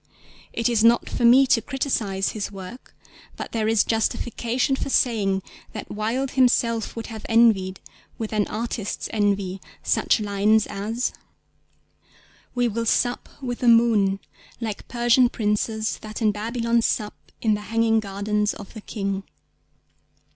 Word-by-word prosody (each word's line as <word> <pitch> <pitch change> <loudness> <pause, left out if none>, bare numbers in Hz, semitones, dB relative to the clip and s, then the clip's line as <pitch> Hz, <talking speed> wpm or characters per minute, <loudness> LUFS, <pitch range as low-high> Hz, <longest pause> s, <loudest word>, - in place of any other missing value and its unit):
It 230 - 0
is 230 -3 +2
not 235 +1 +4
for 240 - -1
me 255 +3 +7
to 240 -3 +3
criticise 220 -9 -1
his 205 -2 -4
work, 195 +5 -10 0.4
but - - -6
there 220 -2 0
is 225 -2 +4
justification 235 +3 0
for 270 - -4
saying 200 -7 +1 0.3
that - - -7
Wilde 235 +6 -1
himself 235 -3 +2
would 230 -1 -5
have 220 -2 -8
envied, 215 -5 +3 0.4
with 220 -1 -4
an 210 -1 +1
artist's 220 -1 -4
envy, 200 -3 0 0.2
such - - +2
lines 210 +1 +2
as— 220 +5 -3 1.4
We 245 -1 +2
will 230 +1 -2
sup 245 +2 +1
with 245 -2 -3
the 245 - 0
moon, 225 -4 +4 0.4
Like 220 -4 -5
Persian 240 +1 +3
princes 220 0 -1
that 215 0 -7
in 220 -3 +3
Babylon 230 +2 0
Sup 210 -2 -1 0.3
in 220 -2 +2
the 210 - -2
hanging 225 0 +3
gardens 210 +1 -1
of 200 - -11
the 220 - -9
King. 195 -2 -3
225 Hz, 140 wpm, -24 LUFS, 205-235 Hz, 1.4 s, me